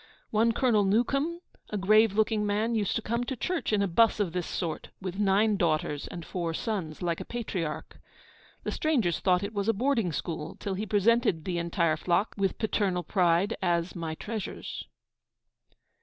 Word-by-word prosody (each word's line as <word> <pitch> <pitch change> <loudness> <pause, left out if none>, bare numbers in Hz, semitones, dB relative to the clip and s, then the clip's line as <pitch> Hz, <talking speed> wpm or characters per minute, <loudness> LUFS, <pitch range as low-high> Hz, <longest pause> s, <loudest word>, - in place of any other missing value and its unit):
One 225 +2 +3
Colonel 230 -4 +3
Newcome, 275 - +1 0.3
a 210 - -2
grave 215 +2 +4
looking 215 0 +2
man, 210 +3 0
used 210 -4 0
to 225 - -1
come 235 +2 -1
to 265 - -3
church 360 +3 -2
in 205 -2 +3
a - - +1
bus 220 +6 +3
of 190 -5 0
this 180 -2 -2
sort, 165 -3 -3
with 190 +1 -5
nine 205 +1 +3
daughters 155 -4 0
and 170 -2 -7
four 170 -3 -3
sons, 180 -8 -3
like 170 -1 0
a - - -3
patriarch. 185 -10 -4 0.6
The - - -2
strangers 245 - +1
thought 185 0 +2
it 200 +2 -4
was 200 +1 -1
a - - +4
boarding 230 -4 +1
school, 160 0 -4
till 200 - -3
he 210 +3 -3
presented 205 -5 +2
the 175 -2 -1
entire 170 -2 +1
flock, 175 +6 +1
with 195 -2 0
paternal 200 -5 0
pride, 180 +3 +2
as 175 -1 0
'my 165 -2 -4
treasures.' 215 +3 -5
200 Hz, 175 wpm, -28 LUFS, 175-220 Hz, 0.6 s, grave